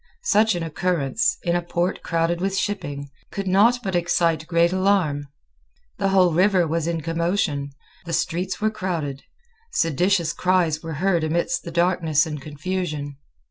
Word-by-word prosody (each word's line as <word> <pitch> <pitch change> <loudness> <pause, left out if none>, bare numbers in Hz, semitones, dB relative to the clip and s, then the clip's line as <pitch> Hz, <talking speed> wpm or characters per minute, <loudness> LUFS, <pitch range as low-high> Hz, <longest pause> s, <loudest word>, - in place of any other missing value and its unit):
Such 220 - +3
an 175 - -2
occurrence, 165 +2 0
in 175 -1 +1
a 175 - +1
port 175 +1 -2
crowded 170 +1 0
with 195 0 -1
shipping, 145 -9 -3 0.2
could 200 - -4
not 220 +6 +4
but 190 -2 -2
excite 170 -2 +1
great 170 0 +3
alarm. 185 -7 +1 0.7
The 195 - +1
whole 185 -3 +4
river 185 +1 +3
was 165 0 -1
in 165 -1 -1
commotion. 165 -3 -1 0.4
The 165 - -4
streets 180 +3 -1
were 215 0 +1
crowded. 165 -9 -3 0.5
Seditious 170 +1 +1
cries 175 -4 +1
were 165 -1 -6
heard 170 +2 +1
amidst 170 +2 -1
the 170 - -5
darkness 170 -3 +2
and 150 -3 -5
confusion. 150 -1 -4
170 Hz, 150 wpm, -23 LUFS, 155-185 Hz, 0.7 s, not